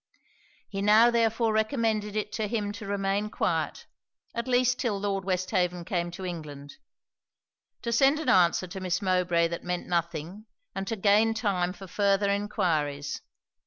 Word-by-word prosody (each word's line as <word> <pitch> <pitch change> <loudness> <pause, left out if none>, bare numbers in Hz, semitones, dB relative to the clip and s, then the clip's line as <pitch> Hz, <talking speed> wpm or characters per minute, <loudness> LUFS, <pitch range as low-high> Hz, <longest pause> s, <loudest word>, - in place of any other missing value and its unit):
He 195 -1 -4
now 215 +4 +6
therefore 230 -1 +2
recommended 220 -2 0
it 210 -1 -2
to 215 0 -2
him 205 -2 -2
to 205 0 -8
remain 200 +1 -1
quiet, - - -2 0.5
at 235 +2 -3
least 250 0 +2
'till 220 -7 -1
Lord 195 -1 -1
Westhaven 180 -2 0
came 175 -1 -1
to 185 +2 -7
England; 145 -5 -7 1.1
to 235 - -2
send 270 +5 +4
an 315 - -5
answer 185 -4 +4
to 185 +2 -7
Miss 180 -1 -1
Mowbray 180 -3 +2
that 170 - -5
meant 180 0 -3
nothing; 170 +4 -3 0.3
and 195 0 -4
to 225 - -1
gain 215 +2 +3
time 185 -6 0
for 195 +1 -10
farther 200 +1 +1
enquiries. 165 -9 -1
200 Hz, 155 wpm, -27 LUFS, 180-220 Hz, 1.1 s, now